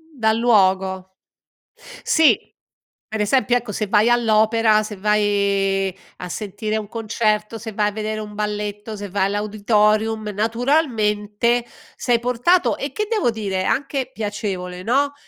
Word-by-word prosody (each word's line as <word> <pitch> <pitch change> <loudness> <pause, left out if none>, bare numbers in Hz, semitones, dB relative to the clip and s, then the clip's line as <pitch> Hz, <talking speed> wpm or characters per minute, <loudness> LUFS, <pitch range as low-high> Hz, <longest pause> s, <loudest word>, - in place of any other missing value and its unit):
Dal 220 -3 +1
luogo. 190 -4 +2 0.9
Sì, 320 -2 +4 0.7
per 220 -1 -3
esempio, 245 +3 +2
ecco, 240 -3 -6
se 210 0 -2
vai 210 +3 +3
all'opera, 220 -2 +3
se 210 0 -7
vai 200 -2 +1 0.2
a 180 - -7
sentire 215 +3 -3
un 215 -1 -5
concerto, 215 -1 -1
se 220 0 -7
vai 210 0 +1
a - - -7
vedere 215 +1 -4
un 210 -1 -7
balletto, 210 0 -4
se 205 -1 -7
vai 190 +1 +1
all'auditorium, 215 +1 +1
naturalmente, 230 -1 0 0.3
sei 240 -2 +1
portato 250 +9 +2
e - - -4
che 425 -1 -3
devo 425 - +1
dire, 200 -4 -3
è - - -3
anche 275 -2 -1
piacevole, 195 -5 -4
no, 280 +6 +1
215 Hz, 140 wpm, -21 LUFS, 205-230 Hz, 0.9 s, Sì